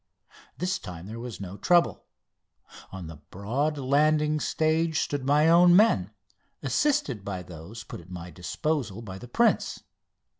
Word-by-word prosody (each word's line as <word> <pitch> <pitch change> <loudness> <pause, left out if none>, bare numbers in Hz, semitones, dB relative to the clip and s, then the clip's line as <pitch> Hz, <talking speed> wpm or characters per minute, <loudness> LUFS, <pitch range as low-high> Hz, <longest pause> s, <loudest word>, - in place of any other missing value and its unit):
This 185 +1 -1
time 90 -3 -9
there 110 +3 -7
was 120 -5 -7
no 95 0 -7
trouble. 175 - +2 0.9
On 95 -2 -7
the 80 -1 -9
broad 130 +11 -1
landing 150 +3 +2
stage 160 +1 +1
stood 145 -2 -2
my 145 +3 +4
own 175 +1 +7
men, 180 - +4 0.5
assisted 140 - +1
by 95 -3 -5
those 90 +7 -10
put - - -9
at 85 - -18
my 90 -1 -8
disposition 115 - -3
by 95 -2 -7
the 125 - -10
prince. 235 - +1
130 Hz, 145 wpm, -27 LUFS, 95-155 Hz, 0.9 s, own